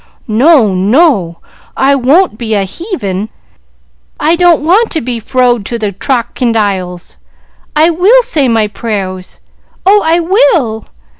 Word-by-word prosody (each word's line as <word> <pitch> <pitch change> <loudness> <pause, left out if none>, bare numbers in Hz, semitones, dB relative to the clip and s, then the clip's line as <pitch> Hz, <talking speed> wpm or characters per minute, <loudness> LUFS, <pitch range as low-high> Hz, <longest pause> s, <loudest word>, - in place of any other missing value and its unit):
"No, 235 - +3
no; 195 - +1 0.4
I 275 +1 +2
won't 280 - +2
be 220 -3 -2
a 200 - 0
heevin! 210 - -5 0.9
I 325 +2 +2
don't 345 -3 +2
want 400 +8 +2
to 320 - 0
be 240 -2 -4
frowed 245 -1 0
to 235 - -4
the 210 -3 -3
trockindiles. 205 - -2 0.6
I 320 +3 +3
will 405 +10 +3
say 310 - -1
my 225 -3 +1
prayers! 195 -4 -6 0.5
oh, 410 +2 +4
I 325 +2 +2
will!" 340 - +1
245 Hz, 130 wpm, -10 LUFS, 210-335 Hz, 0.9 s, oh